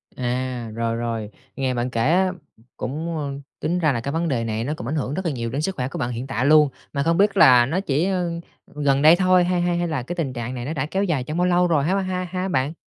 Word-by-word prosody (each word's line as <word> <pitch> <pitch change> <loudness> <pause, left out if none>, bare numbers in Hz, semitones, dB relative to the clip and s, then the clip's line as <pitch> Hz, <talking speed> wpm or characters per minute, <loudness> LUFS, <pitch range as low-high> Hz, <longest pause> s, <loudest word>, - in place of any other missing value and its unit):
À, 125 -1 -3
rồi, 115 0 -1
rồi, 115 -2 -3 0.3
nghe 130 -2 -1
bạn 120 +1 -1
kể 115 - -3
á 185 +7 +3 0.5
cũng, 160 +5 -4
a, 150 - -2 0.4
tính 175 +2 -1
ra 155 -4 +3
là 115 - -2
cái 140 - -3
vấn 165 +2 -1
đề 120 -6 0
này 110 0 -2
nó 145 +5 -2
cũng 115 - -6
ảnh 150 - -2
hưởng 140 -1 -2
rất 190 - -3
là 165 - +1
nhiều 115 -3 -3
đến 140 +5 -2
sức 190 +3 -2
khỏe 125 -1 -2
của 170 +4 -6
bạn 120 -1 -1
hiện 120 +3 -5
tại 125 +1 -1
luôn. 150 0 +6 0.2
Mà 140 0 0
không 165 +1 +2
biết 205 +1 +3
là 125 -2 +7
nó 165 +8 -1
chỉ, 155 -2 0
ờ, 180 -2 0 0.5
gần 140 -2 +1
đây 155 +3 +8
thôi 185 -1 +4
hay 180 0 0
hay 175 0 +1
hay 175 0 0
là 150 -6 -2
cái 175 +7 -5
tình 145 -7 -2
trạng 120 +1 -4
này 120 0 -5
nó 155 - -3
đã 140 -2 -2
kéo 190 +5 -1
dài 155 -9 0
trong 155 +5 -5
bao 180 - +2
lâu 180 0 +3
rồi 155 -5 +2
ha 190 +5 +1
ha 185 -1 -2
ha 185 0 -2
bạn? 150 -4 0
150 Hz, 285 wpm, -22 LUFS, 125-175 Hz, 0.5 s, đây